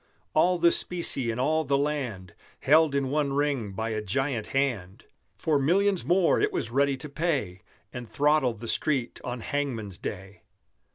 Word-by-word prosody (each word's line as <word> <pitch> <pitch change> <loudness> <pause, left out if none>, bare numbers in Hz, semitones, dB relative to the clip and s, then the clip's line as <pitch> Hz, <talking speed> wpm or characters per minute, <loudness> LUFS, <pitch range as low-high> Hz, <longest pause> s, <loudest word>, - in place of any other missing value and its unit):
All 180 +3 +3
the 170 0 +4
specie 170 -10 +1
in 115 - -2
all 155 +5 +1
the 140 -1 +1
land 130 - -3 0.3
Held 155 0 +4
in 135 -1 0
one 145 -2 0
Ring 140 -8 -1
by 110 +4 -3
a 110 -1 -2
giant 120 +3 -2
hand 120 -10 -2 0.3
For 150 -3 +1
millions 190 +6 +2
more 180 0 +3
it - - +1
was 115 - -3
ready 140 +1 +2
to 150 - -8
pay, 140 - -2 0.3
And 125 -2 -7
throttle 145 -4 +2
the 115 +2 -9
Street 130 -1 -1
on 125 -1 -5
hangman's 115 -9 -3
day. 95 0 -7
140 Hz, 165 wpm, -27 LUFS, 115-150 Hz, 0.3 s, the